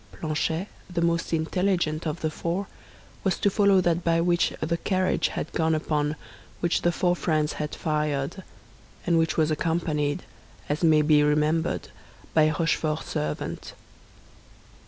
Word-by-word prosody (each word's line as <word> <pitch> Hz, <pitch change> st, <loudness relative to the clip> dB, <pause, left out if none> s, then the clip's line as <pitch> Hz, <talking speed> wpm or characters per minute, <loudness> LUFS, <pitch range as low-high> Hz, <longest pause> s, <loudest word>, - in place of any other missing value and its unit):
Planchet, 160 Hz, +3 st, -2 dB, 0.2 s
the 170 Hz, -1 st, 0 dB
most 170 Hz, 0 st, 0 dB
intelligent 165 Hz, -1 st, 0 dB
of 155 Hz, +2 st, -3 dB
the 155 Hz, -, -1 dB
four, 170 Hz, +5 st, -2 dB, 0.6 s
was 190 Hz, -, +1 dB
to 200 Hz, -, +2 dB
follow 200 Hz, -2 st, +4 dB
that 175 Hz, -1 st, +1 dB
by 165 Hz, 0 st, +2 dB
which 175 Hz, 0 st, +2 dB
the 170 Hz, +2 st, -1 dB
carriage 185 Hz, +1 st, +1 dB
had -, -, -4 dB
gone 160 Hz, -1 st, +2 dB
upon 150 Hz, -1 st, 0 dB, 0.4 s
which 175 Hz, 0 st, +1 dB
the 175 Hz, -, +2 dB
four 175 Hz, +1 st, +1 dB
friends 155 Hz, -3 st, 0 dB
had 150 Hz, -, -3 dB
fired, 150 Hz, +1 st, -1 dB, 0.6 s
and 170 Hz, -1 st, +3 dB
which 165 Hz, 0 st, 0 dB
was 155 Hz, -1 st, +2 dB
accompanied, 155 Hz, -2 st, -1 dB, 0.4 s
as 150 Hz, +4 st, -2 dB
may 155 Hz, -2 st, +5 dB
be 150 Hz, -1 st, +5 dB
remembered, 150 Hz, +2 st, +1 dB, 0.4 s
by 155 Hz, -1 st, +5 dB
Rochefort's 155 Hz, 0 st, -1 dB
servant. 75 Hz, 0 st, -4 dB
160 Hz, 140 wpm, -26 LUFS, 150-175 Hz, 0.6 s, may